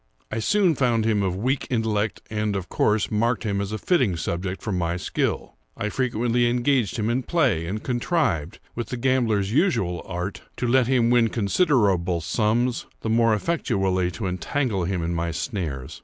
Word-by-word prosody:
I 110 - -2
soon 190 - +3
found 120 -5 +1
him 110 -2 +2
of 95 -2 0
weak 130 +7 -1
intellect, 110 -3 -1
and, 105 -1 -1
of 95 -2 -4
course, 105 0 +1
marked 115 +3 +1
him 100 -3 -1
as 100 0 -4
a 110 - -2
fitting 125 - +1
subject 90 +3 -3
for 105 - -2
my 85 -2 -1
skill. - - -2 0.2
I 105 - -2
frequently 120 0 +1
engaged 120 -3 +1
him 110 -1 -1
in 120 +3 +1
play, 125 - +1
and 105 +4 -4
contrived, 120 - 0 0.2
with 120 - -4
the 125 - -4
gambler's 115 -6 +1
usual 100 - +1
art, 90 +2 -4 0.2
to 125 - -1
let 125 0 +3
him 120 -3 +3
win 120 -2 +5
considerable 100 - +2
sums, 115 +8 0
the 110 - -2
more 115 -1 +4
effectually 95 - 0
to 110 - -5
entangle 95 - -1
him 90 -1 -1
in 85 +1 -1
my 85 0 -1
snares. 80 - -4
110 Hz, 175 wpm, -24 LUFS, 95-125 Hz, 0.2 s, win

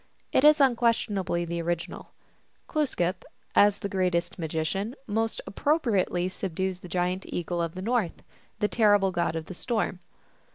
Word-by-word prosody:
It - - +3
is 300 0 +7
unquestionably 230 -9 +2
the 170 0 -3
original. 170 0 -3 0.6
^Glooskap, 200 - 0 0.4
as 205 0 +5
the - - -1
greatest 180 -2 0
magician, 165 - -2
most 225 +1 -1
appropriately 205 - +1
subdues 190 0 -3
the 180 - -10
giant 180 +2 0
eagle 175 0 -2
of 165 0 -3
the 185 - -5
North, 225 -5 -1 0.3
the 210 -1 +1
terrible 205 -4 +4
god 170 -2 0
of 160 -1 -3
the 185 - -8
storm. 215 -2 -2
190 Hz, 140 wpm, -27 LUFS, 175-220 Hz, 0.6 s, is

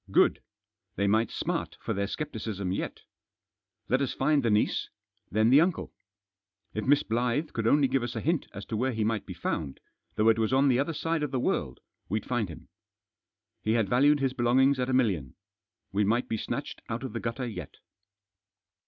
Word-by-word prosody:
Good - - +4
1 - - -31 0.5
They 100 - 0
might 110 +3 +3
smart - - -3
for - - -3
their 100 +1 -1
scepticism 110 -9 -4
yet 95 - -3 0.9
Let 130 +3 +2
us 135 - -1
find 145 +1 +2
the 120 - +1
niece; 105 0 +1 0.4
then 110 +3 +3
the 140 +3 +8
uncle. 175 0 -1 0.8
If 110 - -3
Miss 145 +1 +5
Blyth 125 +7 -1
could 115 -1 -1
only 145 +2 +5
give 135 0 +1
us 120 0 -4
a - - -1
hint 165 0 0
as 100 +1 -8
to - - -4
where 130 +4 0
he 110 -1 0
might 110 0 -1
be 90 - -6
found, 80 -4 -3 0.4
though 110 +1 +4
it 115 0 +3
was 110 +1 +1
on 135 +1 +4
the 125 -1 +3
other 145 +4 0
side 165 +1 -1
of 150 - -1
the 130 -1 -1
world, - - -1 0.3
we'd 105 +3 -1
find 120 -6 -1
him. 80 - -11 0.9
He 110 - +1
had 115 -4 +1
valued 145 +5 +4
his 135 -1 +1
belongings 130 +2 +3
at 125 0 0
a - - 0
million. 95 - +1 0.6
We 100 +2 +2
might 115 +5 +1
be 110 - -1
snatched - - -4
out 115 +3 -3
of 130 -5 -5
the 115 - -2
gutter 115 +3 -3
yet. 115 -3 -7
120 Hz, 200 wpm, -28 LUFS, 110-135 Hz, 0.9 s, the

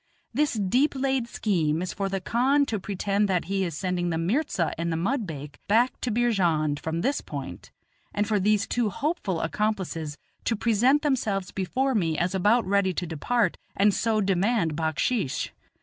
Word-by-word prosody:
This 295 +4 +1
deep 245 +8 +2
laid 265 -2 0
scheme 165 -10 0
is 185 - -4
for 195 -1 -2
the 195 0 -1
khan 260 +9 +2
to 220 -5 -2
pretend 200 +1 0
that 180 -2 +1
he 195 +1 0
is 170 -5 -3
sending 180 -1 -1
the 165 - -1
mirza 180 - 0
and 170 +1 -2
the 160 - 0
mudbake 165 - -3
back 235 +4 +2
to 250 - -1
Beerjand 175 -11 +1
from 160 +3 -2
this 275 +7 0
point, 135 - -7 0.4
and 205 0 0
for 210 -1 +2
these 205 +1 +2
two 240 -3 0
hopeful 220 - -2
accomplices 165 -5 -2 0.3
to 230 - +1
present 235 +6 +3
themselves 215 -10 0
before 255 +9 0
me 165 -8 +1
as 175 +2 0
about 210 +5 +3
ready 190 -1 +2
to 180 - -2
depart, 180 +6 0 0.2
and 200 +1 +4
so 220 0 +1
demand 195 -3 +1
backsheesh. 160 - 0
200 Hz, 170 wpm, -26 LUFS, 170-235 Hz, 0.4 s, and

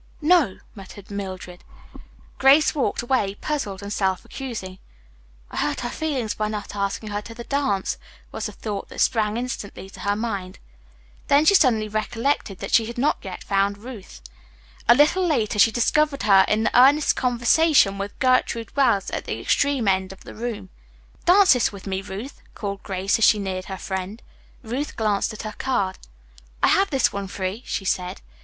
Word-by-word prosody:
"No," 310 - +3 0.2
muttered 195 0 -12
Mildred. 185 -3 -7 0.8
Grace 275 +3 +5
walked 280 -5 -1
away, 240 -6 0
puzzled 205 -9 -4
and 200 +1 -4
self 190 -2 -1
accusing. 215 -9 -7 0.7
"I - - -7
hurt - - -1
her 240 0 -3
feelings 270 -9 -2
by 215 - -2
not 210 -1 -5
asking 200 +2 -3
her 205 0 -3
to 230 +2 -11
dance," 240 -5 -1 0.3
was - - -4
the - - -7
thought 205 -3 -6
that - - -9
sprang 220 -2 +1
instantly 205 -6 -6
to - - -13
her 205 0 0
mind. 200 -4 -4 0.7
Then 285 +2 +4
she 400 - +6
suddenly 245 - +4
recollected 215 0 -2
that - - -6
she 225 -1 +4
had 235 - -7
not 280 +5 +1
yet 190 -2 -8
found 200 0 +1
Ruth. 215 - -11 0.7
A 240 - +9
little 300 +7 +4
later 235 -11 0
she 225 - +6
discovered 280 +5 +1
her 195 -2 +6
in 220 +1 +1
earnest 275 +5 +5
conversation 245 -3 +3
with 200 +1 -5
Gertrude 255 -3 +1
Wells 235 -9 +2
at - - -4
the - - -4
extreme 280 -6 +1
end 190 -1 +1
of 195 - -13
the - - -10
room. 215 -4 -5 0.6
"Dance 375 0 +7
this 250 -3 +1
with 200 -2 -11
me, 190 -1 -2
Ruth," 200 +8 -8
called 200 -1 -5
Grace, 195 +2 -1
as 225 - +5
she 215 - +5
neared 190 -2 -4
her 190 - -6
friend. 190 +4 -5 0.4
Ruth 250 +6 -4
glanced 215 -1 0
at 215 - -8
her 215 -1 -5
card. 200 -8 -1 0.6
"I - - +6
have 395 0 +3
this 270 -5 +1
one 200 -1 -4
free," 190 +3 -4
she 195 - -3
said. 180 -1 -2
215 Hz, 175 wpm, -23 LUFS, 195-260 Hz, 0.8 s, A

